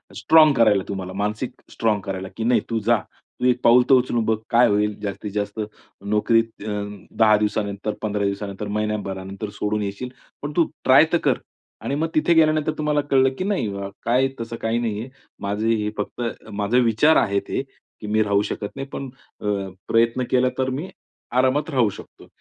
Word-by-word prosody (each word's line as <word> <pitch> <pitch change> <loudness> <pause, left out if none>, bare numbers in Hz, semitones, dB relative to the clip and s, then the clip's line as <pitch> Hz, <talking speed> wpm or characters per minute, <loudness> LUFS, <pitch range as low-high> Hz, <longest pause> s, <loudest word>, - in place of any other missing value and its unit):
Strong 155 -2 +6
करायला 105 -4 +4
तुम्हाला 95 -2 -5
मानसिक 105 +5 -2 0.2
स्ट्राँग 110 -2 +1
करायला 95 -1 -4
की 115 - -2
नाही 120 +2 +3
तू 115 -1 0
जा. 115 +2 +3 0.4
तू - - -1
एक 125 -1 +3
पाऊल 125 +1 +6
तर - - +7
उचलून 120 -3 +1
बघ. 110 0 +1
काय 120 +1 +5
होईल 105 0 0
जास्तीत 105 0 -5
जास्त. 105 +1 -3 0.5
नोकरीत 115 +2 +1
अ, 110 - -4 0.4
10 110 -2 +4
दिवसानंतर 105 0 -2
15 105 -1 -1
दिवसानंतर, 100 +1 -3
महिन्याभरानंतर 100 -1 -3
सोडून 105 0 0
येशील 100 +5 -4 0.3
पण 145 - -4
तू 170 -2 +3
ट्राय 135 +4 +7
तर - - +6
कर 135 -4 +3 0.4
आणि 140 - -2
मग 160 +3 0
तिथे 160 +2 +3
गेल्यानंतर 155 -1 +3
तुम्हाला 150 -1 +1
कळलं 135 -1 +4
की - - -2
नाही, 195 - 0 0.4
काय 125 +3 +3
तसं 115 0 -5
काही 115 +1 0
नाही 110 -3 -2
आहे. 125 - -7 0.3
माझं 100 +2 -2
हे 110 -2 +1
फक्त 105 +4 -4 0.3
माझे 105 +4 +1
विचार 120 +7 +4
आहेत 100 -1 +1
हे - - -1 0.4
की 105 - -6
मी 110 +1 +2
राहू 100 -1 +2
शकत 105 - -4
नाही 135 0 -5
पण 135 -1 -6 0.3
अ, - - -7 0.4
प्रयत्न 115 +2 +2
केला 130 0 +3
तर 130 0 0
मी 145 +8 -4 0.5
आरामात 130 +5 +2
राहू 125 -7 +2
शकतो - - -12
115 Hz, 180 wpm, -22 LUFS, 105-130 Hz, 0.5 s, तर